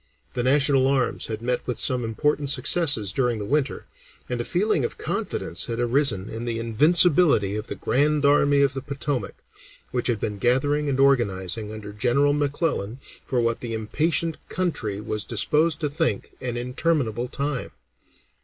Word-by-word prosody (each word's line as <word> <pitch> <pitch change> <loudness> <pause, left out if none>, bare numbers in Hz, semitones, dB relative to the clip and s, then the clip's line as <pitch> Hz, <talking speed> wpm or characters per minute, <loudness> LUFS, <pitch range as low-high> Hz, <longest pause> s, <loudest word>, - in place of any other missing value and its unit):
The 125 - -1
national 135 +1 +3
arms 135 -2 0
had 110 0 -5
met 125 0 -2
with 125 - -2
some 125 -1 +2
important 145 +5 -1
successes 145 - +3
during 125 -3 0
the 105 - -5
winter, 145 +3 -1 0.4
and 120 -1 -2
a - - -2
feeling 180 - 0
of - - -3
confidence 85 - -3
had 115 0 -4
arisen 120 -5 0
in 115 +1 -6
the 115 -1 -2
invincibility 140 - +4
of 105 +1 -5
the - - -5
Grand 150 +2 +1
Army 145 0 +4
of 140 -1 +1
the 135 - -4
Potomac, 140 -5 -4 0.5
which 125 -1 0
had 120 -4 0
been 105 -1 -4
gathering 145 +5 +1
and 135 -1 -1
organizing 105 -6 +1
under 105 -1 -8
General 130 +6 +2
McClellan 145 - -1 0.3
for 125 -2 0
what 115 0 0
the 115 -2 -4
impatient 155 +9 0
country 115 - -2
was 105 0 -3
disposed 150 +7 +1
to 150 - +1
think 155 +3 -2
an 125 -2 -3
interminable 125 -2 -1
time. 140 +1 -3
130 Hz, 165 wpm, -24 LUFS, 115-145 Hz, 0.5 s, invincibility